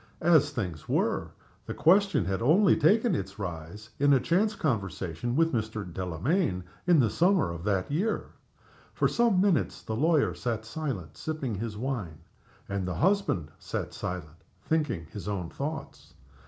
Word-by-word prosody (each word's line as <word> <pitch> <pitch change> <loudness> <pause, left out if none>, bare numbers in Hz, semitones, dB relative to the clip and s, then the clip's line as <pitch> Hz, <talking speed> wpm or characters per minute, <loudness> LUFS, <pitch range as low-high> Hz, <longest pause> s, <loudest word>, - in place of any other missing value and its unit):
As 160 -3 +5
things 90 -10 -5
were, - - 0 0.4
the - - -4
question 190 - +4
had 95 +3 -1
only 170 - +5
taken 220 +9 +3
its 95 0 -3
rise 100 +3 -7
in 145 0 +5
a 135 - +5
chance 205 +9 +1
conversation 100 - -2
with 165 +1 +3
Mr. 110 -2 -2
Delamayn 90 - -1 0.2
in 175 -3 +6
the 115 -5 +4
summer 175 - +3
of 85 0 -7
that 100 +2 0
year. 195 +10 -1 0.6
For - - +3
some 235 -6 +2
minutes 190 -4 +1
the 110 - -3
lawyer 155 +4 +3
sat 115 -3 -3
silent, 110 - -5
sipping 155 -7 -3
his 105 +1 -4
wine, 110 - -3 0.5
and 100 -2 -2
the 90 - -2
husband 175 - +1
sat - - -4
silent, 80 -3 -6 0.2
thinking 145 - 0
his 100 -1 -7
own 95 -5 -3
thoughts. 155 +3 -6
115 Hz, 155 wpm, -28 LUFS, -, 0.6 s, in